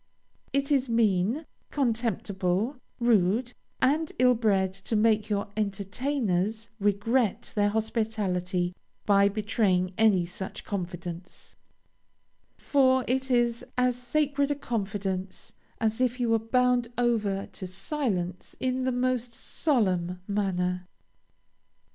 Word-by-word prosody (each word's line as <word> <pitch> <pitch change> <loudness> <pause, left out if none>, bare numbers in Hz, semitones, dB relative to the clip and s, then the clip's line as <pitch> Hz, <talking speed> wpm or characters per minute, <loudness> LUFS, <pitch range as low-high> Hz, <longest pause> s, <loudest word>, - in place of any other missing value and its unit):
It 275 +1 0
is 270 -3 +2
mean, 230 - +2 0.2
contemptible, 220 - 0 0.2
rude, 235 +1 +2 0.3
and 305 +4 +2
ill 250 0 +5
bred 195 -5 +1
to 195 +3 -4
make 215 0 +3
your 205 -1 -1
entertainers 215 0 -1
regret 205 +3 +1
their 205 -1 +2
hospitality 205 -5 -1 0.3
by 200 -1 +5
betraying 200 -3 +1
any 205 -6 +4
such 190 +2 -6
confidence; 175 -2 -6 1.0
for 260 -2 +3
it 265 +2 0
is 240 -2 +2
as 250 0 +3
sacred 280 +3 0
a 290 - +1
confidence 195 -6 -3 0.3
as 225 +2 0
if 250 0 +1
you 240 -2 +1
were 225 0 +4
bound 250 +1 +2
over 215 -5 +1
to 185 - -7
silence 190 - -3
in 255 0 0
the 260 - +1
most 250 -1 0
solemn 185 - 0
manner. 180 -3 -1
220 Hz, 110 wpm, -27 LUFS, 190-250 Hz, 1.0 s, ill